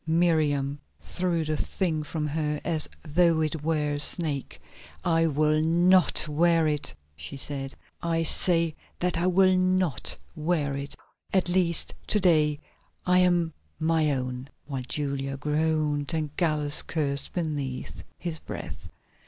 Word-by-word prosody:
Miriam 155 -4 +1 0.2
threw 175 -3 -2
the 155 0 -1
thing 160 -1 -2
from 150 +1 -4
her 150 0 -2
as 160 -3 -1 0.2
though 165 +1 +3
it 155 0 -2
were 150 -1 0
a 145 - -3
snake. 150 -2 0 0.5
"I 165 0 +3
will 155 0 +2
not 175 +2 +3
wear 165 +2 +2
it," 150 -1 -1 0.2
she 75 - -7
said. 135 -1 -3 0.3
"I 165 -1 0
say 165 -1 +4 0.2
that 180 -1 0
I 175 - +1
will 185 +1 +4
not 185 -4 +1 0.2
wear 155 -3 -1
it; 140 +1 -6 0.4
at 185 -2 +1
least 175 -2 +1
to 210 - +3
day 155 -5 +3 0.5
I 180 0 +4
am 175 -3 +2 0.3
my 160 -1 +2
own," 130 -1 -3 0.2
while 135 -3 -4
Julia 140 -2 -2
groaned 150 0 0
and 155 -2 -3
Gallus 150 -4 +4
cursed 140 -3 -2
beneath 145 -7 -4 0.2
his 165 -3 -4
breath. - - -8
155 Hz, 135 wpm, -26 LUFS, 145-170 Hz, 0.5 s, say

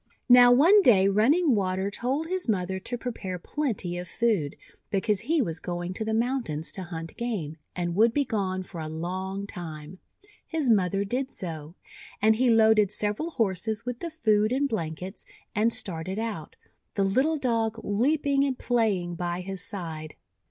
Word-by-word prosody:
Now, 245 0 +9
one 335 +12 +7
day 195 - +5
Running 265 - +3
Water 190 -1 0
told 265 +9 -1
his 365 -4 -3
mother 190 -2 0
to 240 +5 -4
prepare 220 -7 -5
plenty 195 - -3
of 180 - -6
food, 205 -12 0 0.3
because 205 0 +1
he 300 +6 +1
was 165 -5 -2
going 175 +1 -4
to 220 - -3
the 220 - -2
mountains 230 - -1
to 190 - -6
hunt 165 -2 -7
game, 195 -11 -3 0.2
and 175 -1 -2
would 225 +5 +4
be 285 +3 +1
gone 190 -5 -2
for 175 -2 -8
a 155 - -4
long 185 +5 -4
time. 165 -2 -8 0.5
His 310 -7 +1
mother 195 -1 +2
did 255 +6 -2
so; 165 - -7 0.4
and 220 +1 +4
he 250 +1 +3
loaded 220 -3 +5
several 210 +10 -2
Horses 220 - -1
with 245 -1 -4
the 340 - -4
food 215 -9 +2
and 275 +3 +1
blankets, 185 - -4 0.3
and 225 +1 +2
started 185 -1 -2
out, 220 -9 -4 0.4
the 200 - +2
little 260 +11 +2
Dog 230 -4 0
leaping 275 +6 +2
and 270 -3 -1
playing 210 -8 0
by 175 +1 -3
his 190 0 -5
side. 160 -6 -6
210 Hz, 165 wpm, -27 LUFS, 180-245 Hz, 0.5 s, Now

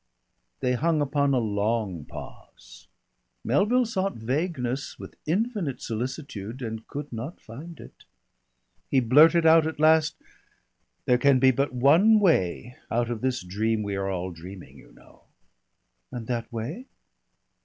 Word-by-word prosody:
They 125 -1 +1
hung 160 +5 +1
upon 140 0 +1
a 135 - +2
long 105 - -1
pause. - - -12 0.6
Melville 245 +6 +2
sought 195 -3 -2
vagueness 130 +1 -3
with - - -10
infinite 195 - -1
solicitude, 120 -1 -5
and 110 -1 -6
could 145 -2 -7
not 125 +9 -6
find 150 +9 -11
it. - - -14 0.8
He 135 - +3
blurted 155 +7 +5
out 160 0 +6
at 160 -1 -5
last: 155 0 +4 0.9
"There 125 0 +3
can 140 0 +4
be 130 +1 +5
but 135 +3 -1
one 160 - +5
way 125 - +1
out 120 0 0
of 115 - -4
this 130 -5 -1
dream 105 +4 -1
we 100 -1 -3
are 95 0 -2
all 90 -1 -3
dreaming, 90 +3 -11
you - - -18
know." - - -21 0.9
"And 120 -3 -6
that 120 +1 -3
way?" 140 - -5
130 Hz, 140 wpm, -26 LUFS, 110-160 Hz, 0.9 s, out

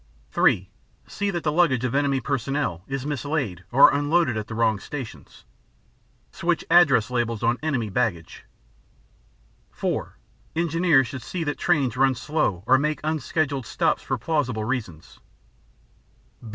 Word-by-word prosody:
(3) - - +2 0.4
See 205 0 -3
that 175 -4 -3
the 150 - +1
luggage 150 -7 +2
of 125 - -2
enemy 140 -1 +1
personnel 135 - -2
is 135 -1 -4
mislaid 145 - -3
or 135 +2 +7
unloaded 145 -2 +1
at 110 -1 -4
the 115 - -6
wrong 110 -2 +1
stations. 135 -2 -9 0.9
Switch 170 0 -1
address 140 -10 +5
labels 120 -3 -1
on 120 +2 +1
enemy 140 -8 -1
baggage. 100 -6 -2 1.3
(4) - - -3 0.4
Engineers 165 -4 +3
should 130 +1 -7
see 165 +9 -4
that 145 -2 -3
trains 140 -9 +1
run 135 0 +3
slow 115 - -1
or 130 +3 +5
make 150 +1 -1
unscheduled 150 -3 -1
stops 165 -3 0
for 130 - -2
plausible 125 -4 -1
reasons. 110 -10 -5
135 Hz, 135 wpm, -24 LUFS, 115-155 Hz, 1.3 s, or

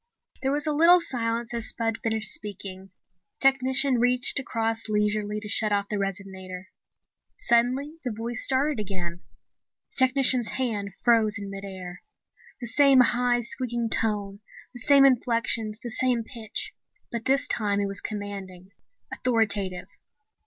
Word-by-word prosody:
There 270 - 0
was 290 +1 -1
a 305 - +1
little 335 +4 +6
silence 235 -6 -2
as 235 0 -1
Spud 225 -1 -1
finished 220 -2 0
speaking. 195 -2 -5 0.5
The - - -29
technician 265 0 +1
reached 250 +2 +2
across 225 -3 -2
leisurely 210 0 0
to 210 - -7
shut 215 0 0
off 200 0 0
the 210 - -2
resonator. 190 -1 -5 0.7
Suddenly 255 +7 +1
the 250 - -2
voice 230 +2 -5
started 275 0 +1
again. 180 -4 -5 0.7
The - - -11
technician's 255 -3 +3
hand 210 -7 -2
froze 225 -2 +3
in 200 -1 -7
mid 195 0 -7
air. 185 -2 -8 0.6
The 245 - -6
same 270 +2 +5
high, 245 0 +2
squeaking 235 -1 -3
tone, 205 -3 -1 0.3
the 245 - -9
same 275 +2 +6
inflections, 230 -4 +1
the 240 -1 -7
same 245 -1 +2
pitch. 225 -2 -6 0.4
But 235 -1 -4
this 275 +2 +2
time 205 -5 0
it 200 - 0
was 200 0 -5
commanding, 195 -3 -7 0.4
authoritative. 205 -6 0
225 Hz, 145 wpm, -26 LUFS, 205-250 Hz, 0.7 s, little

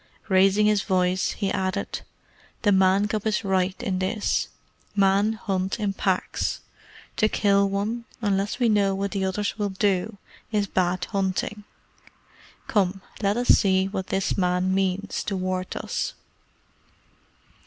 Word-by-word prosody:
Raising 195 +2 +4
his 210 -1 +3
voice, 185 -1 +1
he 200 -3 -2
added, 190 0 -2 0.6
"The 205 - +4
Man 190 +1 +4
cub 215 0 -2
is 215 +1 0
right 190 -1 +1
in 185 -2 -1
this. 205 +3 0 0.5
Men 200 +2 +3
hunt 195 -1 -2
in 205 -2 0
packs. 190 -1 -1 0.6
To 215 - +3
kill 200 -1 +3
one, 215 +4 -2
unless 200 -2 0
we 245 -2 +2
know 200 -3 +3
what 200 +1 -2
the 195 -2 -1
others 200 +3 -2
will 205 -1 0
do, 195 +1 0 0.3
is 210 -2 +1
bad 185 -2 0
hunting. 195 +1 -2 1.0
Come, 195 -2 +1 0.2
let 200 +1 +1
us 245 0 -1
see 190 -1 +4
what 195 -2 -4
this 195 0 0
Man 180 0 +1
means 195 +1 -1
toward 185 -2 -2
us." - - -3
195 Hz, 135 wpm, -25 LUFS, 190-205 Hz, 1.0 s, Raising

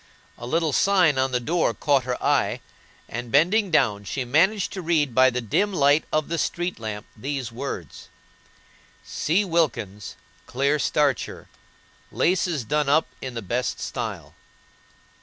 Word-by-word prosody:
A 120 - -9
little 160 +1 0
sign 180 -8 +3
on 130 0 +1
the 125 - +1
door 155 -2 0
caught 140 +1 +1
her 125 -1 -2
eye, 125 -6 +1 0.5
and, 120 0 -6
bending 185 +9 +3
down, 110 -11 +2
she 125 +6 -4
managed 180 - +2
to 190 - -5
read 155 -6 +1
by 130 +2 +6
the 125 0 -3
dim 200 - 0
light 145 -3 +3
of 155 -1 0
the 170 -1 -2
street 175 +2 -2
lamp 105 -2 -5
these 130 +1 -4
words: 115 - -7 0.9
"C. 185 +7 0
WILKINS, 115 - -1 0.3
Clear 140 +4 +1
Starcher. 145 -3 0 0.6
"Laces 170 -5 +1
done 150 +5 0
up 155 +3 +4 0.2
in 130 -2 -6
the 115 - -4
best 120 +6 -2
style." - - -5
140 Hz, 145 wpm, -24 LUFS, 120-165 Hz, 0.9 s, by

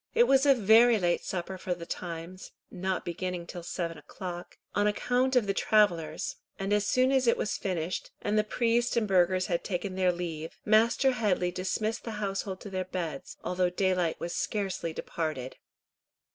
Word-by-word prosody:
It 475 - +7
was 270 - +4
a 275 - +7
very 225 +1 +6
late 175 -3 +1
supper 185 +1 -4
for 180 -1 -2
the 170 -1 -8
times, 170 +2 -6 0.2
not 190 0 -2
beginning 175 0 -3
till 175 +1 -7
seven 170 -1 -4
o'clock, 175 -2 -8 0.2
on 205 0 +2
account 250 +5 +1
of 245 -4 +4
the 200 - 0
travellers; 195 -7 +1 0.2
and 195 +1 -1
as 210 -1 +2
soon 255 +1 +3
as 260 -2 +2
it 230 - +4
was 210 - -1
finished, 180 -2 -3
and 205 - -1
the 215 - +4
priest 235 +2 +1
and 220 -2 +2
burghers 185 -1 +3
had 170 -1 -1
taken 185 0 -3
their 185 -1 +2
leave, 165 -2 -5
Master 230 +5 +4
Headley 200 -7 +1
dismissed 215 +5 -2
the 225 - -5
household 195 -2 -3
to 205 - -8
their 185 -1 -2
beds, 170 -6 -5
although 180 0 +1
daylight 180 -2 0
was 170 - -4
scarcely 195 -5 -2
departed. 155 -5 -4
190 Hz, 175 wpm, -29 LUFS, 175-215 Hz, 0.2 s, It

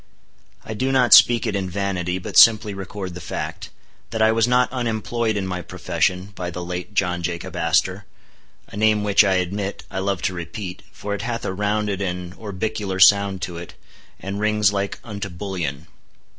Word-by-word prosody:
I 110 - -5
do 130 +5 -1
not 130 -2 +4
speak 120 0 +7
it 110 -3 -1
in 95 -2 -2
vanity, 90 -1 -2
but 95 +1 -7
simply 110 -1 +7
record 95 -1 -6
the 90 - -8
fact, - - -5 0.4
that 110 - -4
I 110 0 +5
was 115 +1 +2
not 125 0 +3
unemployed 115 -2 -1
in 100 - -2
my 90 -1 -3
profession 90 +2 -2
by 90 -2 -5
the 90 0 -6
late 90 +3 -6
John 90 -2 0
Jacob 85 0 -4
Astor; - - +1 0.6
a - - -11
name 105 0 +2
which, 105 0 +5
I 95 -2 +2
admit, 95 +2 -2
I - - -3
love 95 -2 -2
to 95 - 0
repeat, 90 +2 -6
for 100 +1 -5
it 100 - -3
hath 115 +1 -3
a - - -2
rounded 105 0 -1
and 90 -1 -4
orbicular 105 -1 -4
sound 100 0 +5
to 85 -2 -5
it, 85 0 -9 0.4
and 100 +1 -5
rings 105 -1 +2
like 100 0 -2
unto 100 -3 -6
bullion. 85 -6 -4
100 Hz, 185 wpm, -22 LUFS, 90-105 Hz, 0.6 s, speak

